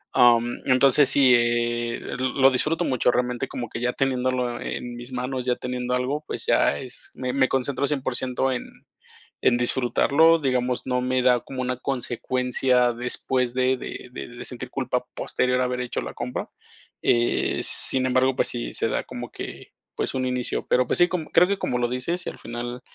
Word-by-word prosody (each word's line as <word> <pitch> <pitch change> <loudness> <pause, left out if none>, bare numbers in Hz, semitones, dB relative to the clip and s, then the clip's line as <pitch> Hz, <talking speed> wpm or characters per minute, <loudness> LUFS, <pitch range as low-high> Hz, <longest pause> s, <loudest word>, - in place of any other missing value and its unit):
Am, 120 -1 +4
entonces 135 +2 +5
sí, 135 -2 +5
eh, 120 0 0 0.2
lo 130 +1 +3
disfruto 155 +6 +1
mucho, 130 -2 +1
realmente 125 +1 -1
como 120 -2 -5
que - - -6
ya 125 0 0
teniéndolo 130 -2 -1
en 120 0 -5
mis 120 +2 -9
manos 125 0 -3
ya 125 -1 +1
teniendo 125 0 -3
algo, 135 +4 -2
pues - - -3
ya 70 - +3
es 125 - -9
me 125 -1 -3
me 135 -1 +3
concentro 135 +2 -1
100%, 130 -2 0
en 125 - -3 0.7
en 120 - +3
disfrutarlo, 140 +6 +3
digamos, 125 -3 0
no 125 -1 0
me 130 0 0
da 125 -1 +4
como 130 -1 -6
una 125 -1 -2
consecuencia 125 -1 0
después 125 +1 -1
de 130 0 +2
de - - -8
de 70 -1 -7
de - - -9
sentir - - -6
culpa - - -2
posterior 125 0 0
a 125 - +2
haber 125 0 -2
hecho 125 - -3
la - - -7
compra, 125 +1 -4 0.5
eh, 120 0 +1
sin 130 -1 +4
embargo, 130 +1 +2
pues, - - +1
sí - - -3
se - - 0
da - - -1
como - - -7
que - - -9 0.2
pues - - -2
un 130 -1 -1
inicio, 125 -1 -2
pero 125 0 +3
pues - - +1
sí, 175 - +6
creo 180 0 +2
que 200 - +1
como 125 -9 -2
lo 120 - +1
dices 125 +9 -3
y - - -2
al - - -10
final, 120 +1 -6
125 Hz, 185 wpm, -24 LUFS, 120-130 Hz, 0.7 s, sí